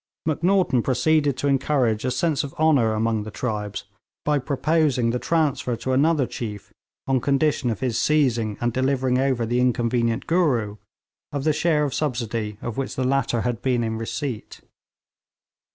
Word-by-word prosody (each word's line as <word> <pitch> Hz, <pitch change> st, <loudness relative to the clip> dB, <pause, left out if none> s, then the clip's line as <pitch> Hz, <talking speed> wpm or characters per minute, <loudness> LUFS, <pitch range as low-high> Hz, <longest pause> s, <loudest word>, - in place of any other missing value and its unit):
Macnaghten 170 Hz, -3 st, +2 dB
proceeded 140 Hz, +3 st, +1 dB
to 140 Hz, -, -1 dB
encourage 135 Hz, -5 st, +1 dB
a -, -, +1 dB
sense 155 Hz, +4 st, 0 dB
of 140 Hz, -, -7 dB
honour 145 Hz, -8 st, +3 dB
among 110 Hz, 0 st, 0 dB
the 105 Hz, -, -6 dB
tribes 105 Hz, -3 st, -4 dB, 0.4 s
by 150 Hz, -1 st, +2 dB
proposing 140 Hz, -3 st, +1 dB
the 125 Hz, -, -1 dB
transfer 150 Hz, -7 st, 0 dB
to 130 Hz, -, -4 dB
another 145 Hz, +1 st, +3 dB
chief, 105 Hz, -4 st, -7 dB, 0.3 s
on 130 Hz, -2 st, +1 dB
condition 140 Hz, -1 st, +1 dB
of 110 Hz, -1 st, -3 dB
his 120 Hz, -3 st, 0 dB
seizing 120 Hz, -8 st, +1 dB
and 120 Hz, -1 st, -1 dB
delivering 130 Hz, 0 st, +1 dB
over 130 Hz, -3 st, +1 dB
the 120 Hz, +2 st, 0 dB
inconvenient 120 Hz, -1 st, +1 dB
'Gooroo,' 125 Hz, -, +1 dB, 0.5 s
of 140 Hz, -1 st, -3 dB
the 155 Hz, 0 st, +2 dB
share 155 Hz, -1 st, +1 dB
of 140 Hz, -3 st, -1 dB
subsidy 115 Hz, -7 st, -2 dB
of 120 Hz, -, -4 dB
which 135 Hz, -, -3 dB
the 130 Hz, -, -1 dB
latter 130 Hz, -3 st, +1 dB
had 120 Hz, -2 st, -2 dB
been 125 Hz, -3 st, +1 dB
in 110 Hz, 0 st, -2 dB
receipt. 115 Hz, 0 st, -5 dB
130 Hz, 160 wpm, -23 LUFS, 115-145 Hz, 0.5 s, honour